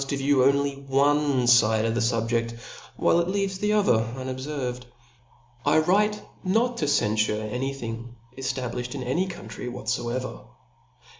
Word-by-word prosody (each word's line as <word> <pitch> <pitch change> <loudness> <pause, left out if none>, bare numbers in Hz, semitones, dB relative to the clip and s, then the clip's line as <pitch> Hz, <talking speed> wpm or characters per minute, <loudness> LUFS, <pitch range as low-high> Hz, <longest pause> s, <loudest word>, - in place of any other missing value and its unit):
to 140 +1 -2
view 135 -1 +3
only 140 +1 +3
one 140 -1 +2
fide 110 -2 +5
of 115 - 0
the 120 - 0
fubje(a^ 115 0 0 0.4
while 170 - +3
it 170 - 0
leaves 195 0 -1
the 210 +1 +1
other 205 - +4 0.2
unobferved.,.. 130 -1 -4 0.8
I 145 +2 +3
write 205 +6 +3 0.2
not 230 +6 +1
to 150 - 0
cenfure 110 -5 +1
any 135 +2 -1
thing 115 -1 -7 0.2
eftabliflied 130 -1 -3
in 130 - -4
any 165 +10 0
country 120 - -8
whatfoevcr. 125 +1 -3
130 Hz, 140 wpm, -25 LUFS, 120-150 Hz, 0.8 s, fide